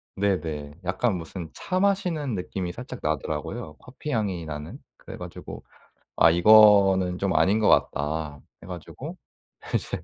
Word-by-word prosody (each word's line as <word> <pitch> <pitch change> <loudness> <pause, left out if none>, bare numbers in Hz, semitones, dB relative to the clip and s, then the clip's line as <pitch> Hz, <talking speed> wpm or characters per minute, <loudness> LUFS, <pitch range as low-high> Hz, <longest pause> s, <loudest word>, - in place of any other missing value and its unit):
네네. 80 -6 -2
약간 95 +4 0
무슨 85 0 -7
차 185 - -2
마시는 180 - 0
느낌이 90 -2 -4
살짝 125 +5 -8
나더라고요, 75 +1 -3
커피 135 +4 -8
향이 100 - -1
나는. 80 - -7 0.2
그래 - - -10
가지고 - - -9 0.5
'아 80 - +6
이거는 95 -1 +6
좀 100 0 -1
아닌 105 +4 +3
것 105 - +2
같다.' 75 0 +1 0.2
해 - - -11
가지고 90 -3 -8 0.6
이제 - - -2
95 Hz, 280 characters per minute, -25 LUFS, 80-110 Hz, 0.6 s, 아